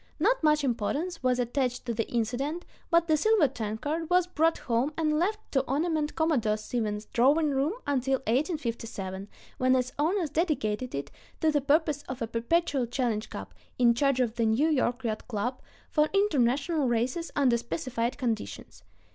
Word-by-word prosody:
Not 475 +10 +2
much 300 -1 +3
importance 280 - -1
was 255 -1 +2
attached 250 0 -1
to 235 - -1
the 225 0 -2
incident, 255 +9 -2 0.2
but 335 0 +3
the 315 - +4
silver 410 0 +4
tankard 265 +7 -3
was 360 0 +4
brought 330 -2 +1
home 245 +4 0
and 305 -2 +1
left 420 +5 0
to 270 - +3
ornament 305 +1 0
Commodore 270 -10 +1
Stevens' 215 -1 -3
drawing 290 +5 +3
room 275 +5 +1
until 270 -1 +1
1857, 230 - -2 0.3
when 255 0 +4
its 255 0 0
owners 330 0 +1
dedicated 255 - -1
it 140 - -5 0.3
to 315 - +3
the 295 -1 +1
purpose 295 +1 +2
of 260 - -5
a 230 - -1
perpetual 255 +3 0
challenge 235 -3 -1
cup, - - -8 0.2
in 240 -1 +5
charge 275 +1 +1
of 240 -2 0
the 230 - +2
New 255 +9 +3
York 255 -4 0
Yacht 220 -2 -3
Club, 245 +2 -3 0.3
for 305 -1 +3
international 290 - +2
races 250 +8 -1
under 260 -4 +3
specified 235 -2 -3
conditions. 220 - -4
265 Hz, 165 wpm, -28 LUFS, 235-310 Hz, 0.3 s, in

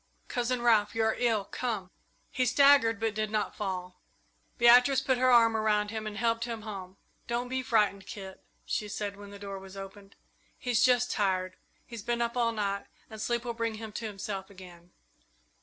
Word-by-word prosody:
Cousin 245 -1 -1
Ralph! 220 -3 +3
You 225 - +1
are 220 0 +2
ill! 225 -5 +1
Come!" 210 -6 -4 0.4
He 255 -1 0
staggered, 255 -3 +5
but 225 -1 0
did 215 0 -2
not 210 -1 -1
fall. 180 -3 -5 0.6
Beatrice 245 +3 +6
put 260 -1 0
her 255 0 +4
arm 230 -2 +6
around 210 -1 +1
him 220 -1 -4
and 210 -1 -6
helped 230 0 0
him 230 -2 -5
home. 195 -3 -8 0.3
"Don't 240 +1 -2
be 260 0 -1
frightened, 210 -5 +1
Kit," 190 -2 -8 0.2
she 210 - -2
said, 205 0 -4
when 205 0 -11
the 200 - -10
door 200 -1 -7
was 190 0 -12
opened; 195 +1 -10 0.4
"he's 245 -3 +1
just 245 -1 +3
tired. 185 -3 0 0.3
He's 235 -3 -8
been 235 +3 -1
up 235 0 -1
all 235 -2 +2
night 200 -2 -2 0.2
and 220 -1 -7
sleep 235 +2 -1
will 235 - -2
bring 230 -1 -2
him 220 0 -7
to 225 +2 -4
himself 195 -1 -5
again." 180 -3 -14
220 Hz, 190 wpm, -29 LUFS, 200-235 Hz, 0.6 s, Beatrice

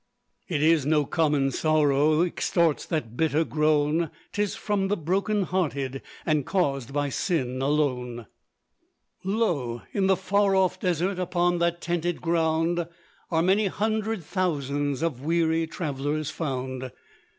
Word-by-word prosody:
It 155 -5 0
is 160 -2 +4
no 150 +1 +2
common 145 -3 +1
sorrow, 155 0 +3
Extorts 170 -2 +1
that 125 -9 -3
bitter 160 +2 +2
groan; 155 +1 +1 0.2
'Tis 205 -1 -1
from 205 -2 -1
the 205 +2 0
broken 195 +5 0
hearted, 140 -8 -2 0.2
And 155 -3 +2
caused 140 - -1
by 145 0 0
sin 130 -5 -1
alone. 125 -5 0 1.0
Lo! 175 - -1
in 195 -2 +1
the 190 -1 +4
far 195 +1 +2
off 185 -1 +2
desert, 180 +2 0
Upon 175 -1 +1
that 170 0 0
tented 175 0 -1
ground, 165 0 +1 0.4
Are 165 -1 +2
many 195 +3 +3
hundred 215 0 -1
thousands 145 -5 -1
Of 145 -7 -1
weary 165 +1 +1
travellers 150 -1 -3
found. 130 -4 -4
160 Hz, 130 wpm, -26 LUFS, 145-180 Hz, 1.0 s, is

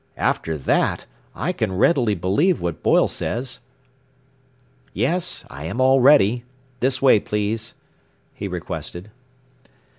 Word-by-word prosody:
"After 80 -1 -1
that, 65 - 0 0.3
I 150 - -2
can 105 - -2
readily 120 - +3
believe 100 - +1
what 85 -2 -4
Boyle - - +3
says. 125 +2 -4 1.4
"Yes, 175 +1 0
I 70 +2 -9
am 100 +10 -4
all 130 +1 +4
ready. 125 -4 +5 0.4
This 130 +1 0
way, 130 -5 +6
please," 105 +3 -3 0.6
he 100 - -5
requested. 90 +1 -6
110 Hz, 115 wpm, -21 LUFS, 90-130 Hz, 1.4 s, way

